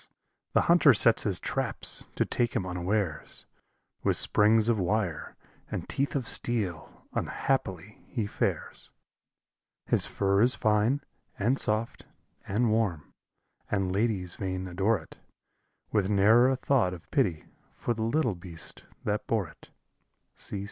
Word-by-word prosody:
the -, -, +4 dB
hunter 170 Hz, -6 st, +5 dB
sets 115 Hz, +2 st, +5 dB
his 100 Hz, -4 st, 0 dB
traps, -, -, -2 dB
to -, -, +1 dB
take 120 Hz, -1 st, -1 dB
him 95 Hz, -, 0 dB
unawares, 90 Hz, -1 st, -2 dB, 0.6 s
With -, -, +2 dB
springs 110 Hz, +1 st, +4 dB
of 115 Hz, -3 st, +2 dB
wire 90 Hz, -2 st, -1 dB, 0.3 s
and -, -, -4 dB
teeth 140 Hz, +2 st, -1 dB
of 130 Hz, -4 st, -1 dB
steel 95 Hz, -10 st, -2 dB
unhappily 105 Hz, -7 st, -2 dB
he 115 Hz, -5 st, -2 dB
fares; 100 Hz, -, -3 dB, 1.0 s
His -, -, +1 dB
fur 100 Hz, 0 st, +1 dB
is 125 Hz, +2 st, +5 dB
fine, 110 Hz, +6 st, +2 dB, 0.4 s
and 120 Hz, +7 st, +1 dB
soft, 110 Hz, +2 st, -1 dB, 0.4 s
and 110 Hz, +3 st, +1 dB
warm, 100 Hz, -9 st, -1 dB, 0.6 s
and 95 Hz, -2 st, 0 dB
ladies 100 Hz, -4 st, -1 dB
vain 95 Hz, -1 st, -4 dB
adore 95 Hz, +5 st, +1 dB
it, 80 Hz, -, -16 dB, 0.7 s
With 100 Hz, -3 st, +1 dB
ne'er 110 Hz, +5 st, +5 dB
a 135 Hz, -, +2 dB
thought 125 Hz, -8 st, +1 dB
of 85 Hz, -, -16 dB
pity 95 Hz, -, +1 dB, 0.3 s
for 120 Hz, -, -2 dB
the 110 Hz, -, -6 dB
little 120 Hz, +1 st, +1 dB
beast 85 Hz, -2 st, -10 dB, 0.2 s
that 105 Hz, 0 st, -2 dB
bore 105 Hz, -7 st, 0 dB
it! -, -, -18 dB
105 Hz, 135 wpm, -28 LUFS, 95-115 Hz, 1.0 s, hunter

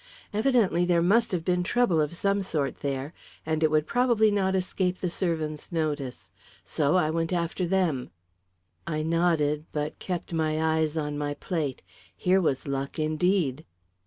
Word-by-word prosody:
Evidently 215 Hz, -, +3 dB
there 175 Hz, -1 st, +3 dB
must 230 Hz, +6 st, +3 dB
have 170 Hz, -3 st, -2 dB
been 180 Hz, -1 st, +2 dB
trouble 180 Hz, -4 st, +2 dB
of 150 Hz, +3 st, -2 dB
some 200 Hz, +3 st, +1 dB
sort 150 Hz, -8 st, -2 dB
there; 140 Hz, +2 st, -3 dB, 0.3 s
and 160 Hz, 0 st, 0 dB
it 155 Hz, -1 st, +3 dB
probably 235 Hz, 0 st, +3 dB
would -, -, 0 dB
not 190 Hz, -2 st, +1 dB
escape 185 Hz, 0 st, -1 dB
the 180 Hz, -2 st, -2 dB
servants' 160 Hz, -4 st, -2 dB
notice. 150 Hz, -, -3 dB, 0.3 s
So 150 Hz, +1 st, +1 dB
I 155 Hz, -4 st, +3 dB
went 165 Hz, +1 st, -1 dB
after 175 Hz, +1 st, -1 dB
them." 170 Hz, -8 st, 0 dB, 0.8 s
I 155 Hz, -2 st, -1 dB
nodded, 160 Hz, -2 st, +1 dB
but 150 Hz, 0 st, -3 dB
kept 175 Hz, -2 st, -4 dB
my 155 Hz, -1 st, 0 dB
eyes 160 Hz, -1 st, +1 dB
on 150 Hz, -1 st, -2 dB
my 145 Hz, 0 st, -2 dB
plate. 150 Hz, -4 st, -3 dB, 0.3 s
Here 185 Hz, +1 st, +3 dB
was 140 Hz, -5 st, 0 dB
luck, 135 Hz, 0 st, -3 dB
indeed! 155 Hz, -2 st, +1 dB
165 Hz, 160 wpm, -27 LUFS, 150-185 Hz, 0.8 s, Evidently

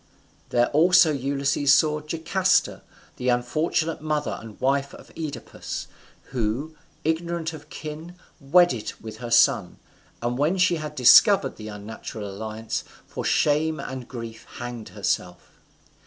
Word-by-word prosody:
There 120 Hz, 0 st, +3 dB
also 170 Hz, +2 st, +5 dB
Ulysses 140 Hz, 0 st, +1 dB
saw 150 Hz, -1 st, +2 dB
Jocasta, 170 Hz, +5 st, +1 dB, 0.4 s
the 125 Hz, 0 st, -1 dB
unfortunate 155 Hz, +7 st, 0 dB
mother 150 Hz, -1 st, -2 dB
and 110 Hz, -2 st, -12 dB
wife 140 Hz, +1 st, 0 dB
of -, -, -15 dB
Oedipus; 150 Hz, -7 st, -6 dB, 0.5 s
who, 125 Hz, +6 st, -2 dB, 0.3 s
ignorant 165 Hz, +1 st, -1 dB
of 150 Hz, -1 st, -11 dB
kin, 155 Hz, +4 st, -8 dB, 0.2 s
wedded 140 Hz, -5 st, +3 dB
with 110 Hz, -1 st, -9 dB
her 120 Hz, +1 st, -6 dB
son, 115 Hz, 0 st, +3 dB, 0.4 s
and 120 Hz, +2 st, -2 dB
when 155 Hz, +6 st, +2 dB
she 180 Hz, -2 st, +3 dB
had 150 Hz, -1 st, -6 dB
discovered 135 Hz, -, +6 dB
the 110 Hz, -, -8 dB
unnatural 105 Hz, 0 st, -7 dB
alliance, 110 Hz, +3 st, -5 dB, 0.2 s
for -, -, -6 dB
shame 155 Hz, +1 st, +2 dB
and 130 Hz, -2 st, -6 dB
grief 115 Hz, -2 st, -8 dB
hanged 120 Hz, -2 st, -6 dB
herself. 90 Hz, 0 st, -3 dB
140 Hz, 125 wpm, -25 LUFS, 120-160 Hz, 0.5 s, discovered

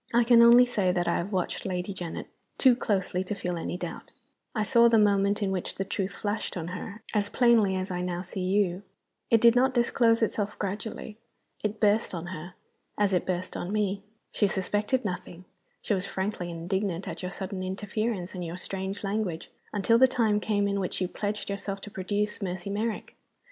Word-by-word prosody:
I 240 Hz, -, +6 dB
can 235 Hz, 0 st, +6 dB
only 240 Hz, +1 st, +8 dB
say 205 Hz, -7 st, +1 dB
that 175 Hz, -1 st, 0 dB
I 170 Hz, -, +2 dB
have 185 Hz, +4 st, -3 dB
watched 185 Hz, -3 st, -1 dB
Lady 185 Hz, +1 st, -3 dB
Janet 175 Hz, -3 st, -5 dB, 0.3 s
too 255 Hz, -3 st, +6 dB
closely 190 Hz, -5 st, 0 dB
to 195 Hz, +2 st, -4 dB
feel 180 Hz, -2 st, -3 dB
any 170 Hz, +1 st, -3 dB
doubt. -, -, -6 dB, 0.5 s
I 215 Hz, -, +1 dB
saw 235 Hz, +3 st, +5 dB
the 230 Hz, -, +5 dB
moment 205 Hz, 0 st, +3 dB
in 195 Hz, -, 0 dB
which 185 Hz, -2 st, -3 dB
the 195 Hz, -, -2 dB
truth 195 Hz, 0 st, -2 dB
flashed 205 Hz, -2 st, -3 dB
on 170 Hz, 0 st, -4 dB
her, 200 Hz, +4 st, -7 dB
as 205 Hz, -2 st, +1 dB
plainly 230 Hz, -6 st, +4 dB
as 185 Hz, 0 st, -3 dB
I 180 Hz, 0 st, -2 dB
now 180 Hz, 0 st, -2 dB
see 190 Hz, +1 st, -5 dB
you. 185 Hz, -1 st, +1 dB, 0.5 s
It 230 Hz, -, +5 dB
did 235 Hz, +1 st, +6 dB
not 260 Hz, +1 st, +3 dB
disclose 235 Hz, -1 st, +3 dB
itself 210 Hz, -1 st, -1 dB
gradually 210 Hz, +2 st, -5 dB, 0.4 s
it 210 Hz, 0 st, -2 dB
burst 210 Hz, -2 st, +2 dB
on 170 Hz, 0 st, -5 dB
her, 175 Hz, +2 st, -8 dB, 0.4 s
as 205 Hz, -2 st, +2 dB
it 180 Hz, -, +1 dB
burst 185 Hz, 0 st, -2 dB
on 180 Hz, -, -4 dB
me. 205 Hz, -2 st, 0 dB, 0.3 s
She 205 Hz, -, +2 dB
suspected 205 Hz, +6 st, 0 dB
nothing 180 Hz, -1 st, -5 dB, 0.4 s
she -, -, +1 dB
was 195 Hz, 0 st, -1 dB
frankly 190 Hz, -2 st, -3 dB
indignant 175 Hz, +2 st, -2 dB
at -, -, -5 dB
your 180 Hz, -, -3 dB
sudden 190 Hz, 0 st, -5 dB
interference 195 Hz, +1 st, -3 dB
and 180 Hz, -, -5 dB
your 170 Hz, +1 st, -5 dB
strange 190 Hz, +2 st, -4 dB
language 195 Hz, -5 st, -2 dB, 0.2 s
until 215 Hz, +3 st, +3 dB
the 260 Hz, -, +8 dB
time 225 Hz, -5 st, +2 dB
came 205 Hz, -1 st, +1 dB
in 200 Hz, 0 st, 0 dB
which 185 Hz, -, -2 dB
you 185 Hz, -, 0 dB
pledged 210 Hz, +3 st, -3 dB
yourself 200 Hz, 0 st, -4 dB
to 205 Hz, -, -8 dB
produce 205 Hz, +3 st, -2 dB
Mercy 185 Hz, 0 st, -3 dB
Merrick. 215 Hz, +2 st, -3 dB
200 Hz, 195 wpm, -28 LUFS, 185-215 Hz, 0.5 s, only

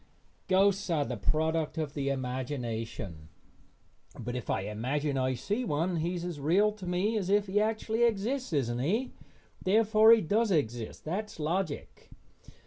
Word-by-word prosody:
Ghosts 195 Hz, +1 st, +3 dB
are 155 Hz, -4 st, +1 dB
the 125 Hz, -, -3 dB
product 160 Hz, +7 st, 0 dB
of 155 Hz, -3 st, -2 dB
the 140 Hz, -2 st, -1 dB
imagination, 120 Hz, -, -4 dB, 0.9 s
but 120 Hz, 0 st, -4 dB
if 125 Hz, -, -5 dB
I -, -, +1 dB
imagine 130 Hz, +8 st, -2 dB
I 130 Hz, 0 st, +1 dB
see 205 Hz, -, -2 dB
one 165 Hz, 0 st, 0 dB
he 170 Hz, +3 st, -1 dB
is 175 Hz, 0 st, -4 dB
as 175 Hz, -4 st, -5 dB
real 185 Hz, +9 st, +3 dB
to 205 Hz, -3 st, -9 dB
me 185 Hz, +5 st, 0 dB
as 190 Hz, -2 st, -3 dB
if 205 Hz, 0 st, +3 dB
he 200 Hz, +1 st, +1 dB
actually 220 Hz, +1 st, -1 dB
exists, 235 Hz, +3 st, 0 dB
isn't 120 Hz, -6 st, 0 dB
he? 215 Hz, -, 0 dB, 0.5 s
Therefore 215 Hz, +2 st, +5 dB
he 230 Hz, -1 st, +7 dB
does 215 Hz, +6 st, +1 dB
exist. 120 Hz, -, -1 dB
That's 195 Hz, +4 st, -4 dB
logic. 160 Hz, 0 st, -3 dB
165 Hz, 155 wpm, -30 LUFS, 130-205 Hz, 0.9 s, he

